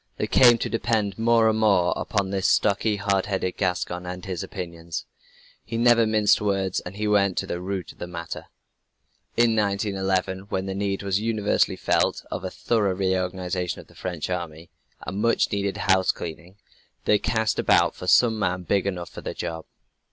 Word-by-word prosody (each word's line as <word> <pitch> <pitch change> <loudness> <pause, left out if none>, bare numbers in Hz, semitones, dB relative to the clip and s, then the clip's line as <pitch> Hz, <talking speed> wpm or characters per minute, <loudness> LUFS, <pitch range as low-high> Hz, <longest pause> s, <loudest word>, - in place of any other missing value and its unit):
They - - 0
came 120 -2 +6
to - - -2
depend 110 -3 -1
more 115 0 +4
and 110 0 +2
more 100 -5 +3
upon 100 -2 -1
this 95 -1 0
stocky, 105 +2 +2
hard 100 -1 0
headed 95 -2 -2
Gascon 90 -1 -2
and 90 0 -6
his 90 -3 -4
opinions. 85 -2 -6 0.6
He 115 - -5
never 115 -1 +5
minced 110 -1 +3
words 95 -2 0
and 90 +2 -9
he 105 +1 -2
went 100 -3 +2
to - - 0
the 85 - -4
root 95 0 -4
of - - -22
the 85 - -5
matter. 85 -1 -7 0.9
In 115 -1 +4
1911, 100 -2 -1
when 95 0 -2
the 95 - -3
need 100 0 -2
was 100 0 0
universally 110 -2 +1
felt, - - +1
of - - -4
a - - -3
thorough 105 -5 0
reorganization 90 -2 -1
of - - -11
the - - -21
French 90 -4 -4
army 85 -2 -5 0.3
a - - -5
much 105 +5 +1
needed 100 -1 -1
house 95 -1 +3
cleaning 85 +2 -8 0.5
they 105 - +4
cast 110 -1 0
about - - +3
for 90 - -9
some 110 +2 +4
man 90 -2 -1
big 100 +3 +1
enough 90 -3 -4
for - - -9
the - - -5
job. 80 -1 -5
95 Hz, 180 wpm, -24 LUFS, 90-105 Hz, 0.9 s, came